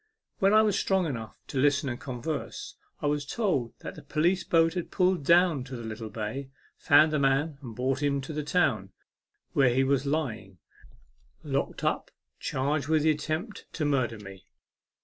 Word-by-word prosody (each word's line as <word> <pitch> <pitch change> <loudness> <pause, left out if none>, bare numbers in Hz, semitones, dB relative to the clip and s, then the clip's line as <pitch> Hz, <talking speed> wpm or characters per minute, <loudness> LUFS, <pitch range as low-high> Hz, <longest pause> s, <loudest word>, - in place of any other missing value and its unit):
When 195 0 +4
I 215 +1 +6
was 205 -2 +2
strong 190 -2 +1
enough 115 -8 -5
to 135 - -3
listen 145 +1 +3
and 120 -1 -3
converse, 135 +4 -5 0.3
I - - 0
was 145 0 +1
told 145 - -1
that - - -6
the - - -11
police 175 +5 +1
boat 165 -1 +3
had 180 -2 -4
pulled 185 -4 +1
down 170 -3 +4
to 130 0 -7
the 120 - -7
little 110 0 -6
bay, 110 +6 -5 0.3
found 155 +1 +5
the 150 - +2
man, 140 +2 +1
and 120 -5 -8
brought 130 +3 -1
him 140 -1 +1
to 135 +4 -7
the 150 - -2
town, 140 - 0 0.6
where 135 -3 +4
he 130 +2 +2
was 140 +1 +1
lying, 120 - -2 0.9
locked - - -2
up, - - 0 0.3
charged 140 +2 -1
with 155 -1 +2
the 155 - +5
attempt 155 +8 -4
to 155 - -2
murder 130 -6 +1
me. 95 -2 -12
145 Hz, 180 wpm, -28 LUFS, 125-160 Hz, 0.9 s, I